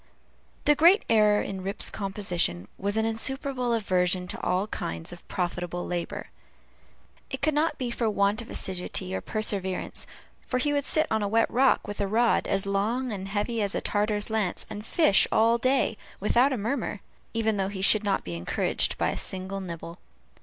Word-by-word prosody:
The 295 - +6
great 345 +8 +5
error 210 -2 +4
in 190 -1 -5
Rip's 195 +2 0
composition 185 - -2
was 200 +2 0
an 220 - +2
insuperable 250 +2 -1
aversion 185 -4 +1
to - - -5
all 185 +2 +1
kinds 85 - -5
of 175 - -14
profitable 175 -1 -3
labor. 175 -1 -4 1.0
It 265 +1 -6
could 310 +1 +3
not 305 +3 +1
be 250 -2 -3
for 235 -1 0
want 200 +1 +1
of 230 - -11
assiduity 180 - -2
or 95 - -2
perseverance; 195 - -1 0.4
for 255 - 0
he 290 +3 +1
would 285 -1 0
sit 310 - +3
on 220 -1 +1
a 205 - 0
wet 225 +2 +2
rock, 260 -2 +3
with 205 0 -4
a 200 - 0
rod 230 +4 +2
as 195 0 0
long 220 +6 0
and 195 -2 -5
heavy 215 +3 -1
as 200 -1 0
a - - +1
Tartar's 210 +1 0
lance, 215 -5 0
and 210 0 -6
fish 310 - +4
all 230 +2 +4
day 255 -3 +1 0.2
without 240 +7 +3
a 260 - 0
murmur, 220 -2 -2 0.3
even 220 -2 +1
though 195 0 0
he 195 -1 -5
should 215 +1 +6
not 200 -2 0
be 85 - -6
encouraged 85 +1 0
by - - +1
a - - -5
single 190 +1 -4
nibble. 170 -2 -7
205 Hz, 185 wpm, -27 LUFS, 190-235 Hz, 1.0 s, The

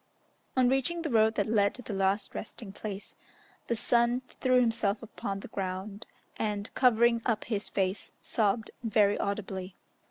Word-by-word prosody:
On 255 -1 +5
reaching 270 +7 +1
the 315 - -2
road 220 -1 +4
that 205 - +1
led 205 -2 +2
to 250 - -9
the 220 - -5
last 195 +1 +1
resting 210 -1 -6
place, 205 -1 -6 0.5
the 235 - +1
son 240 +2 +2 0.2
threw 255 -1 +4
himself 225 -3 +1
upon 200 -2 -5
the - - -8
ground, 195 +2 -4 0.3
and, 210 -1 -2
covering 235 -2 +4
up 230 -3 0
his 210 -3 -3
face, 190 0 -1
sobbed 220 0 +1
very 210 -2 +3
audibly. 195 -2 -3
215 Hz, 155 wpm, -30 LUFS, 200-235 Hz, 0.5 s, On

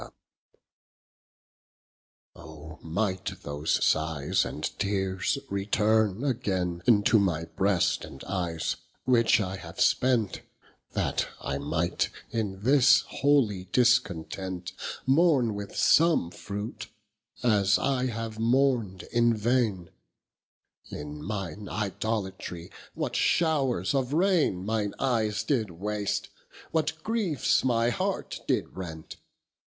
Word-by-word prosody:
III - - -12 2.3
O 80 +1 -11
might 95 +3 -2
those 75 +2 -1
sighes 80 -2 +1
and - - -6 0.2
teares 95 +2 0
returne 105 +2 +1
againe 95 -10 -1
Into 110 0 +5
my 85 -5 0
breast 95 0 +1
and 70 - -10
eyes, 85 -4 -2 0.3
which 115 -3 +4
I 95 -2 -2
have - - -10
spent, 120 -6 +2 0.5
That - - 0
I 70 0 -3
might 80 +4 -1 0.2
in 100 -4 -3
this 135 +3 +6
holy 125 -10 +2
discontent 95 -5 0 0.3
Mourne 135 -5 +3
with 100 -1 -7
some 160 - +4
fruit, 105 +4 -6 0.6
as 105 -4 +4
I 130 -2 0
have 115 -2 -5
mourn'd 115 -5 +1
in 120 -1 +3
vaine; 110 -6 0 1.0
In 75 0 -7
mine 100 0 -5
Idolatry 95 -4 -3 0.2
what - - -3
showres 135 - +1
of 135 -1 0
raine 160 - +2
Mine 105 -2 -1
eyes 110 -5 0
did 110 -4 0
waste? 100 +4 -3 0.4
what 160 -1 +1
griefs 215 - +1
my 120 -2 +2
heart - - -2
did - - -1
rent? 80 -4 -8
105 Hz, 105 wpm, -28 LUFS, 90-125 Hz, 2.3 s, this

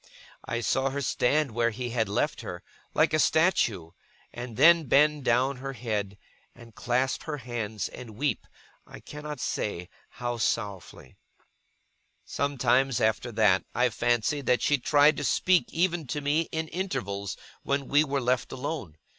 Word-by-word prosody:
I 120 - -2
saw 130 +3 +1
her 140 +1 -3
stand 140 +3 +1
where 115 +1 +1
he 120 +2 -5
had 110 -4 0
left 150 +9 -1
her, 90 -6 -7 0.3
like - - +3
a 155 - +3
statue; 120 - +2 0.4
and 120 -2 -7
then 165 +3 +6
bend 150 +1 +3
down 130 +3 +2
her 135 +1 -6
head, 105 -4 -3 0.4
and 115 -1 -15
clasp 125 +4 -1
her 155 -2 -3
hands, 115 -5 -4
and 115 -4 -10
weep, 135 -1 -2 0.4
I - - -11
cannot 150 -1 -8
say 90 -7 -3 0.2
how 120 -2 -4
sorrowfully. 100 -4 -3 1.1
Sometimes, 135 -2 +1
after 110 +2 0
that, 105 -4 +3
I 125 +1 +3
fancied 120 +4 0
that 125 - +2
she 145 -1 +2
tried 145 +2 +4
to 145 - -3
speak 180 +5 +2
even 170 -2 0
to 135 +5 -2
me, 145 +3 0
in 160 0 -2
intervals 100 - -4 0.2
when 140 -1 -1
we 145 +2 +4
were 140 -2 -1
left 125 0 0
alone. 130 - -5
125 Hz, 155 wpm, -27 LUFS, 115-145 Hz, 1.1 s, then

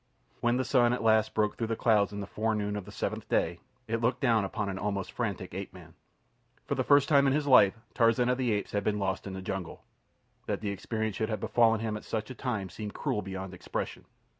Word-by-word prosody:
When 120 +1 +2
the 130 - 0
sun 120 -3 +4
at 125 - -2
last 110 -1 +3
broke 105 -1 +1
through 115 - -1
the 115 - -1
clouds 105 -3 +3
in 100 0 -5
the - - -4
fore 110 +2 -1
noon 105 -1 -2
of 105 -3 -5
the 105 - -10
seventh - - -4
day, 85 +1 +1 0.3
it 115 +1 -1
looked 120 +2 +1
down 115 -6 +3
upon 100 +2 -3
an 95 -1 -3
almost 100 -2 -2
frantic 100 -6 -3
ape 95 0 -5
man. 85 -3 -13 0.7
For - - -1
the - - 0
first 145 0 +5
time 140 -2 +5
in 135 - +3
his 150 0 +1
life, 115 -7 +6 0.2
Tarzan 115 +1 +3
of 125 +1 +1
the 125 -3 +1
Apes 105 -1 -1
had 100 -1 -1
been 105 0 0
lost 95 -1 -2
in 95 - -5
the 95 0 -6
jungle. 95 -2 -5 0.6
That - - -1
the 105 -2 -2
experience 110 +1 -3
should 110 0 -1
have 110 -2 -2
befallen 115 0 +3
him 110 -1 -2
at - - -10
such 110 +1 -3
a - - -5
time 110 -7 -3
seemed 105 +1 -7
cruel 105 - -1
beyond 95 -1 -6
expression. 90 - -5
110 Hz, 240 wpm, -29 LUFS, 100-115 Hz, 0.7 s, life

